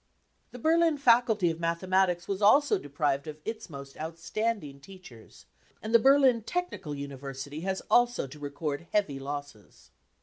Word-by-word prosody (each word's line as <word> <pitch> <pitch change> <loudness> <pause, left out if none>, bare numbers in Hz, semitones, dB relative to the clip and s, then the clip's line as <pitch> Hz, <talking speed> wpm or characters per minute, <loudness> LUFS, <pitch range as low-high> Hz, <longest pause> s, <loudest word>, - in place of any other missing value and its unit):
The - - -10
Berlin 325 +3 +3
Faculty 230 -8 +3
of 165 - -7
Mathematics 175 +1 0
was 195 0 -3
also 280 +8 +5
deprived 145 0 -2
of 150 -1 -7
its 220 -2 -5
most 140 -2 -10
outstanding 165 0 -3
teachers, 160 - -15 0.3
and 220 +1 -6
the 230 - +8
Berlin 265 -2 +5
Technical 350 - -4
University 140 +1 -7
has 190 +2 -3
also 240 -6 +3
to 140 +3 -12
record 145 +2 -4
heavy 155 -10 0
losses. 145 -6 -8
170 Hz, 140 wpm, -28 LUFS, 145-230 Hz, 0.3 s, the